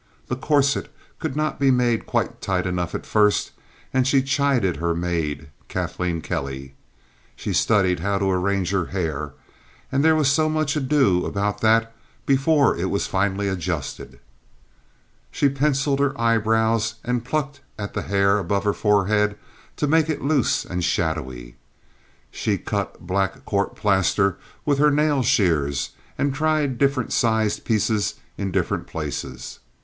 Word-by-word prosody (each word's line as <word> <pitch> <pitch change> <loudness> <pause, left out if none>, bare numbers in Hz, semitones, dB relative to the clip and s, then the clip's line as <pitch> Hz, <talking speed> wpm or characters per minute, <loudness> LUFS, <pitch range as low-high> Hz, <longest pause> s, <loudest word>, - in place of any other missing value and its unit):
The 125 - 0
corset 140 +1 +1 0.3
could 150 -4 -3
not 155 0 -1
be 140 -1 +3
made 120 -3 +2
quite - - -1
tight 90 -1 -1
enough 90 -2 -2
at - - -5
first, 105 -1 +2 0.4
and 130 -1 +2
she 135 -1 +3
chided 135 - +1
her 85 +1 -1
maid, 80 -4 -2 0.2
Kathleen 85 -2 -2
Kelly. 65 -2 -4 0.6
She - - -4
studied 95 -5 +2
how 100 +3 0
to 95 0 +1
arrange 95 0 0
her 95 -4 +1
hair, 75 -6 -3 0.6
and 135 +1 +1
there 160 0 +5
was 145 -3 +3
much 155 -2 +1
ado 135 -11 +2
about 100 0 -2
that 115 +1 +3 0.3
before 140 +1 +3
it - - -2
was - - 0
finally 100 0 0
adjusted. 90 -6 -4 1.1
She 140 - +2
penciled 140 0 +1
her 140 -3 0
eyebrows 110 0 +2
and 120 -1 -1
plucked 145 +2 -3 0.2
at 100 -2 -5
the - - -2
hair 100 +1 +2
about 100 +1 -1
her 105 -1 +1
forehead 105 0 +2 0.4
to - - -1
make 160 +1 +3
it 155 - -2
loose 140 -3 +1
and 90 -1 -3
shadowy. 65 -10 -2 0.7
She - - -1
cut - - -4
black 95 +1 -1
court 100 -1 -1
plaster 100 -2 +2 0.3
with 145 -2 +1
her 150 +1 +5
nail 150 -1 +2
shears 75 - +1 0.3
and 140 -1 0
tried 150 -3 0
different 140 -3 +1
sized 110 -2 +1
pieces 110 -1 +1 0.2
in 100 -1 -3
different 90 -2 -1
places. 65 - -6
105 Hz, 145 wpm, -23 LUFS, 90-135 Hz, 1.1 s, there